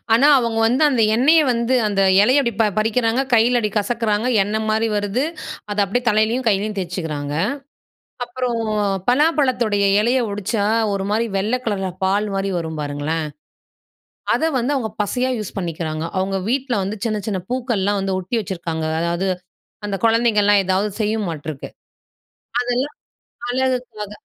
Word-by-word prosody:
ஆனா 240 +5 +5
அவங்க 230 -2 -1
வந்து 250 +6 +2
அந்த 245 -5 +2
எண்ணெயை 305 +7 +5
வந்து 235 +2 0
அந்த 200 -1 0 0.2
இலையை 260 +6 +4
படி 235 - 0
அப்படி 210 0 +2
பறிக்கிறாங்க, 225 +3 +1
கையில 240 +2 +4
அப்படி 210 -3 -1
கசக்கிறாங்க, 215 0 0 0.2
எண்ணெய் 215 +2 -2
மாதிரி 220 +1 +1
வருது, 205 +7 0 0.5
அத 205 - -3
அப்படியே 225 +6 -1
தலையிலேயும் 220 +3 +1
கையிலேயும் 210 +1 0
தேச்சிக்கிறாங்க. 160 -6 -4 0.9
அப்புறம் 240 -1 -3 0.5
பலாப்பழத்துடைய, 250 -7 +2 0.2
இலையை 245 +3 +2
ஒடிச்சா 205 +1 -1 0.3
ஒரு 195 -1 -2
மாரி 225 +2 +1
வெள்ளை 215 +6 0
கலரில 195 -4 -1
பால் 200 +3 +1
மாரி 195 0 -1
வரும் 160 -1 -5
பாருங்களேன். 145 +2 -2 1.1
அதை 320 - +1
வந்து 265 +5 0
அவங்க 225 -5 -2
பசையா 250 +5 -1
யூஸ் 210 -3 -6
பண்ணிக்கிறாங்க. 160 -3 -3
அவங்க 195 +1 -1
வீட்ல 260 -1 0
வந்து 200 +3 -3
சின்ன, 215 -2 -1
சின்ன 200 -4 -2
பூக்கள்லாம் 220 -6 0
வந்து 195 -1 -1
ஒட்டி 190 +6 -2
வச்சிக்கிருக்காங்க. 170 -5 -4
அதாவது, 170 +3 -1 0.6
அந்த 200 - -2
குழந்தைகள்லாம் 210 -3 +4
ஏதாவது 190 +3 +1
செய்யுமாட்டுருக்கு. 170 -10 -3 0.9
அதெல்லாம் 250 - -2 0.5
அழகுக்காக 250 -5 -2
215 Hz, 140 wpm, -20 LUFS, 195-245 Hz, 1.1 s, ஆனா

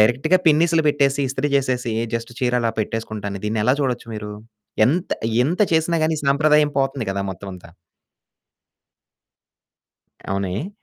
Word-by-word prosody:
డైరెక్ట్‌గా 130 +11 +3
పిన్నీసులు 160 +1 +4
పెట్టేసి, 140 -1 +2
ఇస్త్రీ 135 +2 -2
చేసేసి 125 -4 -1 0.2
జస్ట్ 115 +1 -4
చీరల 125 -2 +1
పెట్టేసుకుంటాను. 105 -2 -4
దీన్ని 110 +1 -1
ఎలా 125 - +4
చూడొచ్చు 125 -4 -2
మీరు? 105 -1 -6 0.5
ఎంత, 170 +8 0 0.4
ఎంత 175 +7 -2
చేసిన 160 +1 +1
గాని, 160 0 0
సంప్రదాయం 150 +1 +3
పోతుంది 135 -4 -2
కదా! 100 0 -2
మొత్తమంతా. 95 -2 -9 2.6
అవునా. 100 0 -1
ఏ? 175 - -5
130 Hz, 120 wpm, -21 LUFS, 110-150 Hz, 2.6 s, పిన్నీసులు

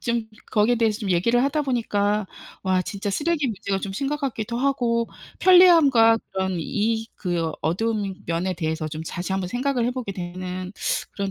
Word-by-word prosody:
좀 235 -2 -1 0.3
거기에 220 +3 +3
대해서 220 -1 +1
좀 205 -3 -2
얘기를 235 +8 +3
하다 290 +2 +1
보니까 210 -5 0 0.4
와 185 -1 +2
진짜 200 +1 -4
쓰레기 295 +5 0
문제가 200 -2 -2
좀 195 - -4
심각하기도 270 -4 -2
하고 240 -4 +1 0.3
편리함과 325 -11 +7 0.2
그런 190 -1 -1
이 220 +6 -1
그 170 -3 -1
어두운 200 +3 -1
면에 170 +3 -1
대해서 160 -1 -2
좀 155 +1 -6
다시 175 +3 -4
한번 190 -2 -1
생각을 250 +1 0
해보게 245 -5 -3
되는 185 +1 -6 0.4
그런 200 -1 -3
210 Hz, 340 characters per minute, -24 LUFS, 185-245 Hz, 0.4 s, 편리함과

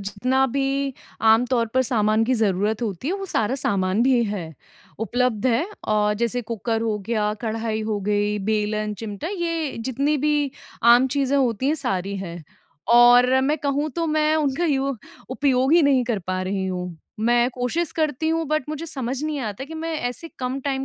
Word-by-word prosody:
जितना 250 +7 0
भी 275 +1 -1 0.3
आमतौर 230 +2 +3
पर 260 - +4
सामान 220 -2 +2
की 255 - +1
ज़रूरत 210 0 0
होती 215 - -3
है 365 - 0
वो 390 0 -5
सारा 225 - 0
सामान 200 -5 0
भी 250 -1 +3
है, 180 -6 -5 0.4
उपलब्ध 245 +1 0
है। 250 +4 +2 0.2
औ 210 -1 +2
जैसे 235 +1 -1
कुकर 225 0 -2
हो 220 -2 -1
गया, 215 -2 0
कढ़ाई 220 -1 -2
हो 215 -1 -1
गई, 205 +1 0
बेलन, 210 +1 -1
चिमटा, 210 - -5
ये 335 -6 -2
जितनी 270 +5 0
भी 295 -1 +1 0.3
आम 240 +2 +6
चीज़ें 280 0 +1
होती 255 -2 +1
हैं 310 - +2
सारी 200 - -2
हैं 175 -3 -6 0.5
और 245 +2 +6
मैं 290 +4 +1
कहूँ 285 +2 -1
तो 335 -1 0
मैं 310 0 +2
उनका 275 -4 -2
उपयोग 265 0 +2
ही 340 0 +6
नहीं 270 -3 +3
कर 230 -4 -1
पा 185 0 -1
रही 190 0 -2
हूँ। 180 -2 -4 0.2
मैं 240 +2 +3
कोशिश 255 +7 -2
करती 315 -1 -1
हूँ 325 0 0
बट 305 -2 0
मुझे 310 +2 -5
समझ 265 -3 -4
नहीं 305 -1 -2
आता 215 +1 -4
कि 320 +3 -9
मैं 325 +1 -4 0.2
ऐसे 290 +7 -8
कम 255 +1 -2
टाइम 270 -1 -2
245 Hz, 180 wpm, -23 LUFS, 215-280 Hz, 0.5 s, आम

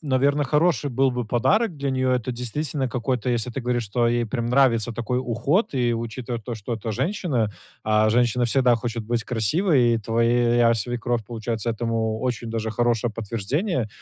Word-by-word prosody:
наверно, 140 0 +1
хороший 150 -1 +2
был 135 +2 +2
бы 125 -2 -3
подарок 180 - +1
для 140 -1 -2
нее. 130 -1 +1
Это 125 +1 -3
действительно 130 +3 -3
какой-то, 125 0 -2
если 120 0 -1
ты 135 - -3
говоришь, 120 -1 -1
что 120 +3 +1
ей 120 0 +1
прям 115 +1 -3
нравится 120 -3 +3
такой 120 +2 -2
уход 130 - 0
и, 120 -2 +1
учитывая 115 +1 -4
то, 120 +1 -5
что 110 +3 -6
это 110 0 -5
женщина, 130 - -1 0.3
а 110 0 +3
женщина 120 +1 +2
всегда 125 0 +3
хочет 115 -1 -4
быть 115 0 -1
красивой, 125 - +2
и 115 - 0
твоя 115 +1 +3
свекровь 120 0 -2
получается 115 -1 -4
этому 115 -1 -1
очень 120 -2 -2
даже 110 -1 -2
хорошее 120 0 0
подтверждение, 115 - -2
120 Hz, 170 wpm, -24 LUFS, 115-130 Hz, 0.3 s, нравится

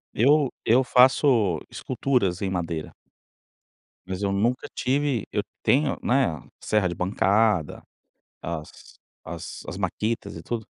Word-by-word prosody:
Eu 140 +3 +4
eu 125 +4 +4
faço 125 - +4
esculturas 120 -8 -1
em 100 - -1
madeira 85 -4 -3 1.2
mas 95 +1 -4
eu 100 - 0
nunca 115 +6 0
tive 135 -3 0
eu 105 - 0 0.2
tenho, 140 +2 +2
né, 120 - +1 0.2
serra 105 -4 +2
de 85 - -4
bancada, 95 -1 +1 0.6
as 80 -2 -7 0.3
as - - -7
as - - -5
makitas 105 +4 -2
e - - -8
tudo, 115 -2 -4
105 Hz, 120 wpm, -25 LUFS, 90-125 Hz, 1.2 s, Eu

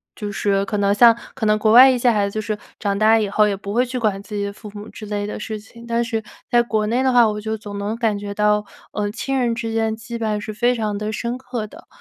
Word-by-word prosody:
就 210 -1 -5
是 195 0 0
可 210 +1 -2
能 200 0 +2
像 230 +2 +7 0.2
可 230 -4 -3
能 215 - +4
国 215 0 +2
外 255 +3 +9
一 255 - +2
些 245 0 +3
孩 205 -2 +1
子 - - -11
就 215 - -2
是 215 0 -2 0.2
长 200 -1 -1
大 220 +1 +5
以 215 - 0
后 210 +1 +3
也 200 - 0
不 200 +1 -6
会 245 +2 +3
去 250 +1 -5
管 210 -4 0
自 210 +1 -8
己 205 - -1
的 200 - -5
父 210 +1 -11
母 205 +1 -8
之 215 - -10
类 205 0 -2
的 210 - -5
事 215 0 -5
情。 235 +2 -15
但 235 0 +1
是 225 -2 -3 0.3
在 240 0 +4
国 220 -2 -1
内 240 +3 +1
的 260 - +3
话， 240 -2 +6
我 210 -1 -2
就 220 +1 -3
总 205 -2 -8
能 205 +2 -2
感 225 -3 0
觉 205 0 -6
到， 210 0 +2 0.3
呃， 205 -1 -2
亲 270 +4 -2
人 240 -2 +1
之 230 -1 -4
间 225 -1 0
羁 235 +1 -7
绊 215 -2 -1
是 215 +1 -6
非 240 +4 +1
常 215 -3 -2
地 210 +1 -3
深 235 +3 -3
刻 245 -4 -5
的。 - - -15
215 Hz, 310 characters per minute, -21 LUFS, 210-235 Hz, 0.3 s, 外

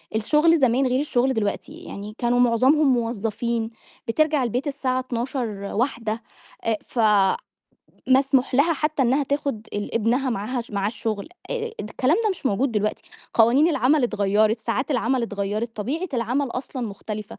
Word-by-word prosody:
الشغل 305 +9 +3
زمان 260 0 +3
غير 255 +1 +1
الشغل 265 -2 +1
دلوقتي، 220 +6 -2
يعني 215 - -8
كانوا 245 0 +1
معظمهم 260 +4 +4
موظّفين 230 0 -1 0.4
بترجع 305 +3 +2
البيت 250 +5 -1
الساعة 265 -2 -1
00:00 255 0 -2 0.3
01:00 230 -1 -1 0.4
آآ 225 -1 +1
ف 240 - -7 1.1
مسموح 265 0 +3
لها 290 +6 +4
حتّى 300 -1 0
إنها 265 +4 +2
تاخد 280 -5 -2
ال 205 +2 -4
ابنها 240 +4 +1
معاها 240 +3 -2
معاه 200 -2 -1
الشغل، 215 +1 -4 0.2
آآ 460 -2 -3
الكلام 255 +8 +1
ده 430 - +3
مش 360 -7 -4
موجود 245 +4 +1
دلوقتي، 210 -1 -1 0.3
قوانين 245 +8 +5
العمل 285 -2 +3
اتغيّرت، 215 0 +2
ساعات 245 +6 -2
العمل 250 -1 +1
اتغيّرت، 215 +1 -3
طبيعة 295 - -2
العمل 250 +4 0
أصلًا 255 +1 -5
مختلفة. 210 0 -7
245 Hz, 145 wpm, -23 LUFS, 225-275 Hz, 1.1 s, قوانين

